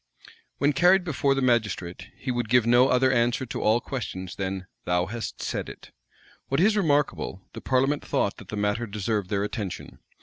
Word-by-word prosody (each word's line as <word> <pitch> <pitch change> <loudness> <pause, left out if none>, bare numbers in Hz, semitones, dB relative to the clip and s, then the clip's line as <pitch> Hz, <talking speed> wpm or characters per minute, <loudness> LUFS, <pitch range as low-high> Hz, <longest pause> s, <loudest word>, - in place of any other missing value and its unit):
When 145 +2 +2
carried 180 +6 +5
before 140 -4 +1
the 135 - 0
magistrate, 110 -8 0
he 130 - -3
would 120 -3 -2
give 125 -1 +4
no 120 +2 +5
other 130 0 +3
answer 120 +1 +1
to 125 - -5
all 110 +2 +3
questions 100 -8 -5
than 95 -1 -3 0.2
"Thou 90 0 +1
hast 115 +4 -6
said - - -3
it." - - -12 0.6
What 135 - 0
is 210 +5 +4
remarkable, 145 - 0
the - - -8
parliament 135 +3 +1
thought - - -1
that - - -12
the - - -5
matter 105 +3 0
deserved 105 -1 -2
their 100 -1 0
attention. 105 -3 -5
120 Hz, 180 wpm, -26 LUFS, 105-135 Hz, 0.6 s, carried